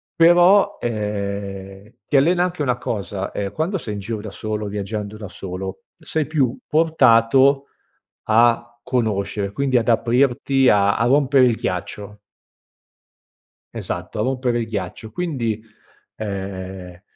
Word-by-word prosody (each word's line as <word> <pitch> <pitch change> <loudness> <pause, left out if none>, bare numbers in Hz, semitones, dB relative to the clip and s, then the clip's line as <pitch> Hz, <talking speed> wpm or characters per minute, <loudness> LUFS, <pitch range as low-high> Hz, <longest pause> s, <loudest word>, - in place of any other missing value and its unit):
però, 175 +4 +5
ehm, 100 -2 -4
ti - - -2
allena 175 +6 +3
anche 180 -3 -3
una 125 -3 0
cosa: 100 -4 -4
ehm, 100 -1 -3
quando 175 +5 -1
sei 105 -8 -5
in 100 - -5
giro 110 +1 -4
da 110 - -7
solo, 105 0 -4
viaggiando 105 +1 -5
da 105 -2 -7
solo, 95 0 -7 0.2
sei 155 -2 -2
più 140 -6 +1
portato 135 -3 +4 0.6
a 120 +1 +3
conoscere, 105 -5 -1
quindi 135 +3 -1
ad 115 0 +1
aprirti, 125 +3 +2
a 100 -1 +3
a 115 - +1
rompere 135 0 +4
il 120 -3 +2
ghiaccio. 100 +3 -5 1.6
Esatto, - - -5
a - - +2
rompere 125 -1 0
il 115 - -3
ghiaccio. 105 0 -5
Quindi, 115 -8 -2 0.5
ehm, 95 -3 -6
115 Hz, 130 wpm, -21 LUFS, 100-135 Hz, 1.6 s, però